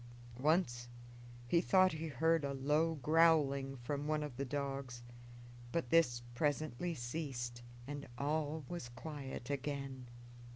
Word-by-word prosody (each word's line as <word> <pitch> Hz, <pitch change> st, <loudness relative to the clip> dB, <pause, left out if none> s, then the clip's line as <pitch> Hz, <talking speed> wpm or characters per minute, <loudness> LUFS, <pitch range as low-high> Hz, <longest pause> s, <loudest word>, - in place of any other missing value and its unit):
Once 130 Hz, -5 st, +2 dB, 0.6 s
he 170 Hz, +7 st, +4 dB
thought 185 Hz, 0 st, +5 dB
he 160 Hz, +1 st, -4 dB
heard 160 Hz, +1 st, +2 dB
a 140 Hz, -1 st, -1 dB
low 150 Hz, +4 st, +2 dB
growling 145 Hz, -3 st, +4 dB
from 140 Hz, +4 st, -3 dB
one 155 Hz, -1 st, +1 dB
of 145 Hz, -4 st, -6 dB
the 135 Hz, -, -2 dB
dogs, 135 Hz, -3 st, -3 dB, 0.7 s
but 130 Hz, -6 st, -1 dB
this 125 Hz, -8 st, +4 dB
presently 155 Hz, +4 st, 0 dB
ceased, 120 Hz, -2 st, -4 dB, 0.2 s
and 145 Hz, +1 st, -5 dB
all 150 Hz, +1 st, -1 dB
was 170 Hz, -9 st, -5 dB
quiet 135 Hz, 0 st, -6 dB
again. 135 Hz, -2 st, -3 dB
145 Hz, 125 wpm, -36 LUFS, 130-160 Hz, 0.7 s, thought